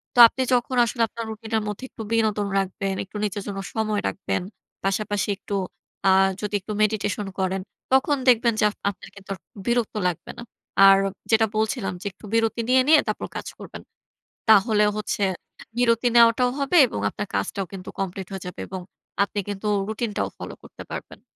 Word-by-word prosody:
তো - - +2
আপনি 260 - -4
যখন 250 +1 +1
আসলে 235 +1 -3
আপনার 230 +1 -6
রুটিনের 220 0 -2
মধ্যে 210 +4 -5
একটু - - -10
বিনোদন 215 -2 +1
রাখবেন, 195 0 -2
একটু 200 +2 -9
নিজের 205 -1 -2
জন্য 200 -1 -4
সময় 215 -2 0
রাখবেন। 195 - -2 0.4
পাশাপাশি 205 0 0
একটু, 200 - -5 0.5
আ 190 - +7 0.3
যদি 210 -1 -4
একটু 210 +3 -6
মেডিটেশন 210 -1 0
করেন, 190 0 0 0.3
তখন 265 +2 +4
দেখবেন 235 -1 +4
যে - - +2
আপ 210 - -10
আপনার 200 - -9
কিন্তু 195 -1 -15
আর - - -19 0.3
বিরক্ত 235 -2 0
লাগবে 175 -3 -4
না। 235 - -7 0.4
আর 195 - +8 0.3
যেটা 225 0 +5
বলছিলাম 220 -1 0
যে, - - -11
একটু 195 - -15
বিরতি 225 0 +2
নিয়ে, 260 0 +6
নিয়ে 310 -1 +7
তারপর - - -2
কাজ - - -5
করবেন। - - -9 0.7
তাহলে 210 0 +5
হচ্ছে 215 -1 -2 0.6
বিরতি 235 0 +3
নেওয়াটাও 235 +1 +6
হবে 280 +5 +1
এবং 160 - -5
আপনার - - -5
কাজটাও 100 - -1
কিন্তু 185 -1 -8
কমপ্লিট 190 0 -3
হয়ে 190 -2 -6
যাবে 180 - -7
এবং 190 0 -5 0.4
আপনি 200 +1 -2
কিন্তু 205 +1 -3 0.2
রুটিনটাও 220 -1 -2
ফলো - - -7
করতে - - -11
পারবেন। - - -8
215 Hz, 175 wpm, -24 LUFS, 195-230 Hz, 0.7 s, আর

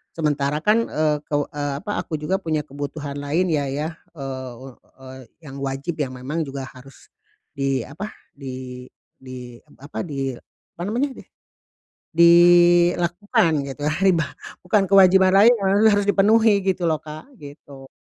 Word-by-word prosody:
Sementara 150 -2 0
kan, 220 +2 +2
eee, 150 -1 0
kew 145 -1 0
eee, 145 -1 -3
apa, 205 - -2
aku 155 - -5
juga 185 +6 -1
punya 155 -3 -1
kebutuhan 145 0 -6
lainnya 150 0 0
ya, 150 +4 -3 0.3
eee, 130 -2 -7 0.3
eee, 130 0 -11 0.3
yang 135 -1 -9
wajib, 140 +5 -4
yang 130 -2 -3
memang 150 +6 -4
juga 135 -1 -6
harus 130 +1 -16 0.5
di 135 -3 -1
apa, 195 +10 -7 0.2
di 130 -2 -8 0.3
di 125 -2 -10 0.2
apa, 145 +2 -6
di 135 -4 -3 0.4
apa - - -8
namanya 260 +5 -1
deh, - - -13 0.9
dilakukan 175 +1 +4 0.2
gitu 140 +2 -8
ya, 155 - 0
ribah 165 -6 +2 0.3
bukan 195 +2 +2
kewajiban 190 -1 +6
lain, 215 +5 +7
eee, 200 +1 +3
harus 205 0 +1
dipenuhi 205 0 +4
gitu 185 -2 0
loh 155 -1 +1
Kak, 155 - -10
gitu. 140 -2 -12
150 Hz, 145 wpm, -22 LUFS, 135-185 Hz, 0.9 s, lain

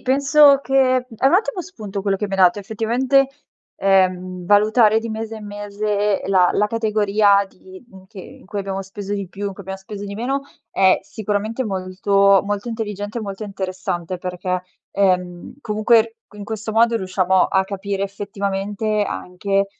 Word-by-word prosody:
penso 280 +1 +5
che 270 +2 +1 0.2
è 250 0 -2 0.2
un 300 - +4
ottimo 380 -1 +1
spunto 215 - -7
quello 195 0 0
che 210 - -3
mi 195 - -10
hai 195 - -1
dato. 180 +1 +5
Effettivamente, 240 +6 +1 0.5
ehm, 185 -2 +1
valutare 215 +2 +4
di 230 0 -5
mese 220 0 -5
in 215 - -9
mese 205 0 -1
la 185 -2 +4
la 210 - +2
categoria 210 -2 +2
di 190 +2 -15
mhmm, 190 -4 -16
che 190 - -14
in - - -14
cui 205 +1 -5
abbiamo 195 0 -4
speso 195 +1 -7
di 200 -2 -3
più, 200 +3 -5
in 200 - -3
cui 195 - -12
abbiam 190 +1 -6
speso 200 +1 -8
di 200 - -6
meno, 255 +6 -1 0.3
è 190 -1 +4
sicuramente 215 +4 -3
molto 195 0 +2
molto 205 +3 -3
intelligente 210 -1 -4
e - - -4
molto 200 0 -6
interessante. 185 -3 -4
Perché, 180 0 -3 0.3
ehm, 180 0 0
comunque, 225 +1 +2
qui 210 - -16
in 205 - -6
questo 220 +1 -5
modo, 230 +1 +3
riusciamo 185 -2 +2
a 190 0 +2
capire, 195 0 -4
effettivamente, 200 +1 -2
anche 195 +2 -2
200 Hz, 170 wpm, -20 LUFS, 190-220 Hz, 0.5 s, penso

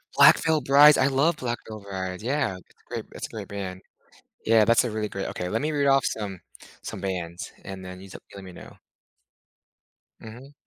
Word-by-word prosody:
Black - - +8
Veil 160 -2 +2
Brides. 140 +3 +7
I 130 - +3
love 140 +4 +2
Black 120 -2 -3
Veil 110 -1 -8
Brides. 95 0 -5
Yeah. 130 -7 -1
It's 90 - -20
a - - -36
great - - -5
it's - - -6
a - - -24
great - - -7
band. 95 -2 -6 0.6
Yeah. 110 -1 +5
That's 115 +2 +4
a 120 - -2
really 105 -1 -3
great 95 -1 -4
okay, 90 - -4
let 140 - -1
me 155 - 0
read 145 -2 0
off 135 -1 +4
some 100 -4 -4 0.4
some - - -7
bands, 90 -3 -5
and 95 -1 -8
then 90 0 -9
you 95 - -12
just - - -11
let 100 - -9
me 90 - -10
know. - - -13 1.4
Mhm. 125 +6 -12
110 Hz, 210 wpm, -25 LUFS, 95-135 Hz, 1.4 s, Black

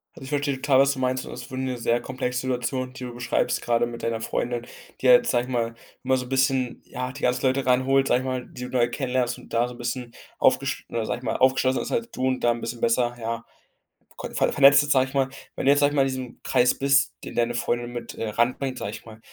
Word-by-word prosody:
Also, - - -11
ich 135 - -8
verstehe 145 -1 0
total, 135 0 +3
was 140 0 +4
du 130 - -8
meinst. 130 0 0
Und - - -8
das 125 - -7
ist - - -13
wirklich 130 0 -3
'ne 125 -1 -3
sehr 120 0 +1
komplexe 125 0 -3
Situation, 130 0 -2
die 130 - -9
du 125 - -6
beschreibst. 120 0 0
Gerade 120 0 +1
mit 120 0 -7
deiner 115 -1 -2
Freundin, 120 0 -2 0.4
die - - +2
halt, - - +7
sage 120 0 +2
ich 130 - -9
mal 115 -2 -1 0.3
immer 130 0 +2
so 125 - -4
'n - - -12
bisschen, 130 -2 +1
ja, 125 +1 -5
die 140 - -11
ganzen 125 +1 +1
Leute 130 0 +1
reinholt, 130 +2 +3
sage 125 - +3
ich - - -6
mal, 130 -1 -3
die 125 - -9
du 125 - -5
neu 120 -2 +2
kennenlernst 125 -2 -1
und - - -15
da 120 +1 +2
so 125 - -9
'n - - -14
bisschen 120 0 -4 0.3
aufgesch - - +2
oder 115 -2 -2
sage 120 - -2
ich - - -17
mal 110 - -1
aufgeschlossener 130 0 +2
ist, - - -6
als 235 0 -1
du 130 - -3
und 130 0 -1
da 120 - +4
'n 120 0 -3
bisschen 120 0 -5
besser, 120 +1 +2
ja, 115 0 -4 0.7
co - - -6
ver - - +2
vernetzten 145 +1 +6
sage 130 -2 +4
ich - - -14
mal. 135 -1 +2 0.3
Wenn - - -4
du 140 - +6
jetzt 145 - +4
sage 145 0 +4
ich - - -3
mal 140 - +4
in - - +1
diesem 130 -2 -6
Kreis 125 -1 +3
bist, 140 0 +3
den - - -7
deine 120 0 +1
Freundin 120 0 -1
mit, 120 -1 -6
äh, 115 - -4
ran 120 +4 +1
bringt, 135 -2 -3
sage 100 - -4
ich - - -10
mal. 110 -1 -12
125 Hz, 275 wpm, -25 LUFS, 120-130 Hz, 0.7 s, halt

